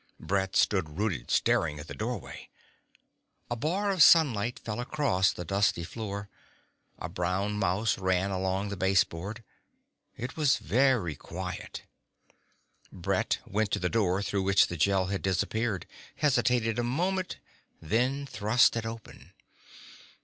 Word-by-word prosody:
Brett 95 Hz, -1 st, -1 dB
stood 80 Hz, -6 st, +1 dB
rooted, 95 Hz, -, -2 dB
staring 75 Hz, -, +2 dB
at 75 Hz, +2 st, -9 dB
the -, -, -7 dB
doorway. 110 Hz, -3 st, -5 dB, 1.0 s
A -, -, +1 dB
bar 185 Hz, -, 0 dB
of 185 Hz, -3 st, 0 dB
sunlight 125 Hz, -9 st, +5 dB
fell 110 Hz, 0 st, -5 dB
across 125 Hz, -8 st, +1 dB
the 90 Hz, -, -7 dB
dusty 100 Hz, -1 st, +1 dB
floor. 100 Hz, +1 st, -5 dB, 0.7 s
A -, -, -5 dB
brown 90 Hz, +4 st, -1 dB
mouse 100 Hz, +3 st, +1 dB
ran 95 Hz, +1 st, +1 dB
along 95 Hz, +1 st, -1 dB
the 100 Hz, -, -4 dB
baseboard. 95 Hz, +3 st, 0 dB, 0.7 s
It 125 Hz, +2 st, -5 dB
was 150 Hz, -4 st, +3 dB
very 125 Hz, -, +2 dB
quiet. -, -, -7 dB, 1.1 s
Brett -, -, -1 dB
went 105 Hz, +1 st, -1 dB
to -, -, +1 dB
the 90 Hz, -, 0 dB
door 100 Hz, -3 st, +1 dB
through 100 Hz, -1 st, -1 dB
which 95 Hz, 0 st, +4 dB
the 85 Hz, -, -4 dB
Gel 95 Hz, +3 st, +2 dB
had 95 Hz, -, -2 dB
disappeared, 95 Hz, +2 st, -1 dB, 0.3 s
hesitated 125 Hz, -5 st, +1 dB
a -, -, +1 dB
moment, 180 Hz, +9 st, -1 dB, 0.4 s
then 125 Hz, -, 0 dB
thrust 115 Hz, -1 st, +3 dB
it 115 Hz, -1 st, -2 dB
open. 115 Hz, -1 st, -10 dB
105 Hz, 135 wpm, -29 LUFS, 95-120 Hz, 1.1 s, sunlight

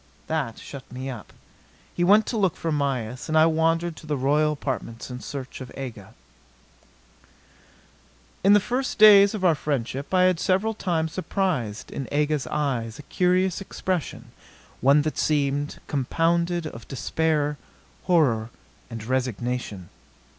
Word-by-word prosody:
That 145 Hz, -8 st, -2 dB
shut 140 Hz, -2 st, -10 dB
me 130 Hz, +2 st, -5 dB
up. 115 Hz, -6 st, -9 dB, 0.6 s
He 175 Hz, -, 0 dB
went 205 Hz, +4 st, +5 dB
to -, -, -3 dB
look 195 Hz, -6 st, +1 dB
for 165 Hz, -, -2 dB
Mayis; 130 Hz, -4 st, -2 dB
and 155 Hz, -, +2 dB
I 155 Hz, -, +7 dB
wandered 165 Hz, +1 st, +1 dB
to 155 Hz, -, -12 dB
the 150 Hz, -1 st, -1 dB
royal 150 Hz, +3 st, +2 dB
apartments 130 Hz, -4 st, -5 dB
in 125 Hz, -, -6 dB
search 135 Hz, 0 st, -7 dB
of 125 Hz, -, -8 dB
Aga. 115 Hz, -8 st, -8 dB, 2.3 s
In 200 Hz, +2 st, +6 dB
the 205 Hz, -, +7 dB
first 250 Hz, +6 st, -2 dB
days 205 Hz, -1 st, +8 dB
of 190 Hz, -3 st, -2 dB
our 170 Hz, -, +6 dB
friendship 140 Hz, -2 st, -3 dB
I 185 Hz, -1 st, +4 dB
had 185 Hz, -2 st, +3 dB
several 195 Hz, +4 st, +1 dB
times 165 Hz, -6 st, -1 dB
surprised 180 Hz, -, -2 dB
in 135 Hz, -, -5 dB
Aga's 150 Hz, -2 st, 0 dB
eyes 125 Hz, -6 st, -2 dB
a 150 Hz, -, -10 dB
curious 180 Hz, +3 st, +1 dB
expression, 185 Hz, -4 st, -4 dB, 0.5 s
one 140 Hz, +3 st, +4 dB
that 155 Hz, -, -3 dB
seemed 145 Hz, -1 st, 0 dB
compounded 170 Hz, +5 st, 0 dB
of 115 Hz, -7 st, -8 dB
despair, 150 Hz, +2 st, -1 dB, 0.5 s
horror 125 Hz, -11 st, +2 dB, 0.4 s
and 115 Hz, -2 st, -7 dB
resignation. 125 Hz, -6 st, -2 dB
150 Hz, 140 wpm, -25 LUFS, 130-175 Hz, 2.3 s, days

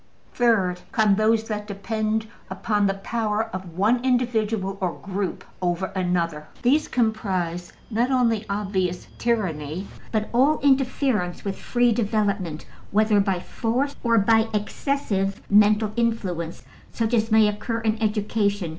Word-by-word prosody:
'' -, -, -36 dB
Third 195 Hz, -7 st, +2 dB
come 215 Hz, -2 st, +3 dB
those 220 Hz, +2 st, +3 dB
that 210 Hz, -2 st, -4 dB
depend 215 Hz, +2 st, -2 dB, 0.2 s
upon 210 Hz, -3 st, 0 dB
the 195 Hz, -, 0 dB
power 220 Hz, +2 st, -2 dB
of 180 Hz, -3 st, -7 dB
one 230 Hz, +6 st, +2 dB
individual 225 Hz, -6 st, 0 dB
or 180 Hz, -3 st, 0 dB
group 195 Hz, -1 st, -4 dB, 0.2 s
over 180 Hz, +1 st, -1 dB
another: 170 Hz, -4 st, -1 dB, 0.2 s
these 290 Hz, +5 st, +3 dB
comprise 190 Hz, -7 st, -1 dB, 0.2 s
not 235 Hz, +4 st, +1 dB
only 235 Hz, -5 st, +2 dB
obvious 190 Hz, -3 st, -1 dB
tyranny, 185 Hz, -7 st, -1 dB, 0.2 s
but 215 Hz, -1 st, 0 dB
all 275 Hz, +6 st, +4 dB
interference 260 Hz, -9 st, +1 dB
with 195 Hz, -1 st, -2 dB
free 245 Hz, +3 st, +1 dB
development, 205 Hz, -7 st, -1 dB, 0.2 s
whether 215 Hz, 0 st, +3 dB
by 195 Hz, -2 st, +1 dB
force 250 Hz, +9 st, -2 dB
or 230 Hz, -1 st, +3 dB
by 225 Hz, +2 st, +4 dB
excessive 205 Hz, -3 st, -1 dB
mental 210 Hz, +1 st, +5 dB
influence 190 Hz, -8 st, -2 dB, 0.3 s
such 230 Hz, 0 st, -1 dB
as 225 Hz, -1 st, +2 dB
may 220 Hz, -1 st, +5 dB
occur 215 Hz, +2 st, -2 dB
in 220 Hz, 0 st, -1 dB
education. 210 Hz, -3 st, 0 dB
210 Hz, 135 wpm, -24 LUFS, 195-230 Hz, 0.3 s, mental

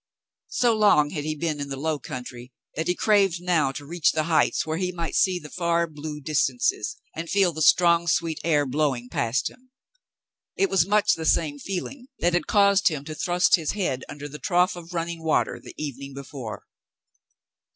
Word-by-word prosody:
So 240 Hz, -2 st, +2 dB
long 205 Hz, -9 st, +4 dB
had 150 Hz, -4 st, -4 dB
he 155 Hz, 0 st, -2 dB
been 155 Hz, -1 st, -2 dB
in 140 Hz, -, -5 dB
the 135 Hz, -, -4 dB
low 155 Hz, +1 st, -1 dB
country 125 Hz, -1 st, -8 dB, 0.2 s
that 160 Hz, +2 st, -3 dB
he 180 Hz, -, +1 dB
craved 195 Hz, -5 st, +2 dB
now 170 Hz, -6 st, +1 dB
to 145 Hz, +1 st, -7 dB
reach 165 Hz, +1 st, +1 dB
the 155 Hz, -, 0 dB
heights 160 Hz, 0 st, +2 dB
where 160 Hz, 0 st, -2 dB
he 180 Hz, -1 st, -1 dB
might 170 Hz, -2 st, -4 dB
see 185 Hz, -2 st, +3 dB
the 150 Hz, -4 st, -10 dB
far 170 Hz, -1 st, +1 dB
blue 150 Hz, -1 st, -7 dB
distances 280 Hz, -, 0 dB, 0.2 s
and 165 Hz, +1 st, -5 dB
feel 195 Hz, -4 st, +3 dB
the 155 Hz, -, -5 dB
strong 170 Hz, +1 st, +4 dB
sweet 165 Hz, 0 st, 0 dB
air 150 Hz, -3 st, +2 dB
blowing 130 Hz, -3 st, -1 dB
past 115 Hz, 0 st, 0 dB
him. 255 Hz, 0 st, -22 dB, 0.9 s
It 390 Hz, 0 st, +1 dB
was 180 Hz, -2 st, +3 dB
much 210 Hz, +1 st, +3 dB
the 160 Hz, -, -4 dB
same 145 Hz, -3 st, +1 dB
feeling 220 Hz, -, -5 dB
that 175 Hz, 0 st, +1 dB
had 175 Hz, -, 0 dB
caused 200 Hz, -1 st, +4 dB
him 150 Hz, -4 st, -1 dB
to 155 Hz, -, -6 dB
thrust 175 Hz, +4 st, +3 dB
his 160 Hz, -3 st, -2 dB
head 175 Hz, -11 st, -2 dB
under 145 Hz, 0 st, -7 dB
the 150 Hz, +1 st, -9 dB
trough 180 Hz, 0 st, +2 dB
of 175 Hz, 0 st, -10 dB
running 165 Hz, 0 st, -3 dB
water 160 Hz, -, 0 dB
the -, -, -11 dB
evening 140 Hz, -2 st, -6 dB
before. 130 Hz, -5 st, -7 dB
165 Hz, 195 wpm, -25 LUFS, 145-180 Hz, 0.9 s, long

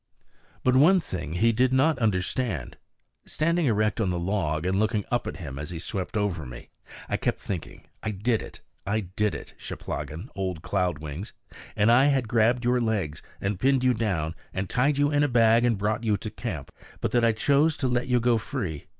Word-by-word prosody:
But 130 Hz, 0 st, +3 dB
one 170 Hz, +8 st, +6 dB
thing 85 Hz, -, -5 dB
he 115 Hz, +7 st, +3 dB
did 125 Hz, +3 st, +2 dB
not 135 Hz, +3 st, +3 dB
understand. 100 Hz, -, -1 dB, 0.5 s
Standing 165 Hz, 0 st, +1 dB
erect 110 Hz, -1 st, +1 dB
on 100 Hz, -, +1 dB
the 90 Hz, -, -1 dB
log, 85 Hz, -4 st, -1 dB
and 95 Hz, +1 st, +1 dB
looking 110 Hz, -1 st, +1 dB
up 120 Hz, -1 st, 0 dB
at -, -, -5 dB
him 70 Hz, -6 st, -7 dB
as 75 Hz, -, -5 dB
he 85 Hz, -, -5 dB
swept 95 Hz, +4 st, -3 dB
over 100 Hz, -6 st, -1 dB
me, -, -, -10 dB, 0.4 s
I -, -, -1 dB
kept -, -, -1 dB
thinking, 95 Hz, -5 st, -6 dB, 0.2 s
"I -, -, -2 dB
did 105 Hz, +3 st, 0 dB
it, -, -, -10 dB, 0.2 s
I 110 Hz, +2 st, 0 dB
did 100 Hz, +3 st, -1 dB
it, -, -, -9 dB
Cheplahgan, 85 Hz, -, -6 dB
old 95 Hz, -4 st, -3 dB
Cloud 90 Hz, -1 st, 0 dB
Wings. 75 Hz, +7 st, -6 dB, 0.4 s
And 105 Hz, +3 st, +4 dB
I 125 Hz, +3 st, +6 dB
had 135 Hz, -4 st, +2 dB
grabbed 120 Hz, +1 st, +2 dB
your 125 Hz, 0 st, +3 dB
legs, 105 Hz, -10 st, -1 dB, 0.2 s
and 100 Hz, -1 st, -2 dB
pinned 135 Hz, +1 st, +3 dB
you 130 Hz, -1 st, +4 dB
down, 95 Hz, -9 st, -1 dB, 0.2 s
and 95 Hz, +1 st, -2 dB
tied 140 Hz, +8 st, +1 dB
you 145 Hz, +1 st, +3 dB
in 145 Hz, -1 st, +3 dB
a 145 Hz, -, +4 dB
bag, 115 Hz, -2 st, +4 dB
and 120 Hz, -3 st, +2 dB
brought 105 Hz, +3 st, -1 dB
you 105 Hz, -3 st, +2 dB
to 110 Hz, -, -6 dB
camp, 95 Hz, -, -5 dB, 0.3 s
but -, -, -1 dB
that 120 Hz, -1 st, +2 dB
I 115 Hz, -, +5 dB
chose 140 Hz, +7 st, +2 dB
to 130 Hz, -, 0 dB
let 125 Hz, 0 st, 0 dB
you 125 Hz, -1 st, +3 dB
go 120 Hz, -1 st, +3 dB
free. 80 Hz, -7 st, -4 dB
110 Hz, 205 wpm, -26 LUFS, 90-125 Hz, 0.5 s, one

